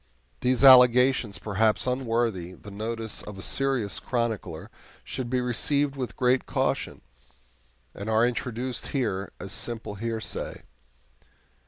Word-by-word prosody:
These 125 +1 +1
allegations, 125 -4 +6
perhaps 105 +1 +1
unworthy 115 -8 -1
the 105 +3 -12
notice 110 +1 -2
of 105 -2 -9
a 95 - -3
serious 135 -7 0
chronicler, 115 -4 -3 0.3
should 120 - -5
be 125 0 +1
received 140 +4 0
with 130 -3 -5
great 125 +1 +2
caution, - - -1 0.9
and 100 +2 -6
are 110 +1 +4
introduced 125 0 -3
here 100 -8 -2
as 95 - -7
simple 115 -1 -3
hearsay. 110 +2 -4
115 Hz, 120 wpm, -26 LUFS, 105-125 Hz, 0.9 s, allegations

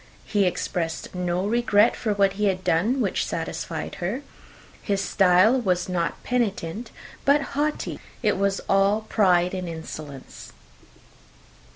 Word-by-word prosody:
He 205 -3 +1
expressed 165 -2 -3
no 180 0 -1
regret 225 0 +3
for 215 -3 -1
what 195 -1 +3
he 210 +1 -1
had 185 -2 0
done 220 +13 +1
which - - 0
satisfied - - -4
her; 215 +11 -2 0.6
his 200 -2 -1
style 195 +5 +4
was 180 -4 0
not 175 -2 -2
penitent, 225 -3 -2 0.3
but 285 +1 +4
haughty. 295 +1 -2 0.2
It 210 - +3
was 195 0 0
all 195 +2 +3
pride 180 -5 +2
and 185 -2 -4
insolence. 155 -4 -9
195 Hz, 130 wpm, -24 LUFS, 180-220 Hz, 0.6 s, style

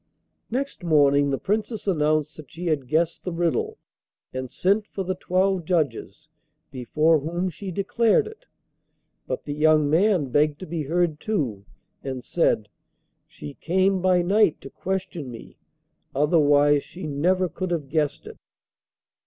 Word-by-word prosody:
Next 265 -4 -3
morning 145 -3 +4
the 135 - 0
Princess 215 - -2
announced 155 -4 +1
that 150 -5 -12
she 175 +2 -8
had 150 -6 -1
guessed 160 +4 0
the 180 - -3
riddle, 175 - -1 0.6
and 130 0 -4
sent 200 - +1
for 195 - -4
the 185 +1 -2
twelve 185 0 0
judges, 155 -2 -2 0.4
before 155 +5 +2
whom 175 +5 -2
she 195 +4 -7
declared 220 - +2
it. 440 +3 -12 0.8
But - - -4
the 145 - -3
young 155 0 +3
man 175 -4 +3
begged 145 +3 +2
to - - -5
be 165 -1 -4
heard, 160 +1 0
too, 135 - -2 0.4
and 130 -2 -5
said: 110 -10 +1 0.6
'She 75 -1 -10
came 190 +2 +2
by 180 -1 +3
night 200 -1 +3
to 135 - -10
question 185 -6 -4
me, 115 -2 -11 0.6
otherwise 145 -1 +4
she 175 -1 -9
never 180 +6 +1
could 185 +1 -5
have 165 -5 -2
guessed 150 0 -1
it. - - -10
165 Hz, 145 wpm, -24 LUFS, 145-185 Hz, 0.8 s, morning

